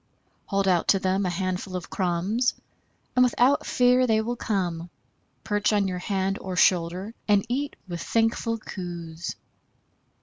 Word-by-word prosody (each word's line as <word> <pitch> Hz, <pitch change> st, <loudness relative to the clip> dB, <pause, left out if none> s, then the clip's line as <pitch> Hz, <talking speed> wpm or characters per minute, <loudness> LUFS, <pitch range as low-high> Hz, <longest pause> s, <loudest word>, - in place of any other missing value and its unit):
Hold 195 Hz, -1 st, 0 dB
out 180 Hz, -3 st, +2 dB
to 195 Hz, -, +4 dB
them 190 Hz, +1 st, 0 dB
a -, -, 0 dB
handful 185 Hz, +1 st, -3 dB
of 180 Hz, -, -6 dB
crumbs 190 Hz, +7 st, 0 dB, 0.6 s
and 250 Hz, -, +4 dB
without 250 Hz, +2 st, +3 dB
fear 250 Hz, +1 st, +4 dB
they 220 Hz, -1 st, +3 dB
will 235 Hz, +2 st, -2 dB
come, 175 Hz, -7 st, -2 dB, 0.5 s
perch 210 Hz, 0 st, +1 dB
on 205 Hz, -2 st, +2 dB
your 180 Hz, -1 st, -3 dB
hand 195 Hz, +1 st, -1 dB
or 185 Hz, -1 st, -4 dB
shoulder 180 Hz, +4 st, +2 dB
and 205 Hz, -1 st, +3 dB
eat 280 Hz, +4 st, -2 dB
with 175 Hz, -2 st, -5 dB
thankful 230 Hz, +4 st, 0 dB
coos. 175 Hz, -5 st, -6 dB
195 Hz, 145 wpm, -26 LUFS, 180-225 Hz, 0.6 s, to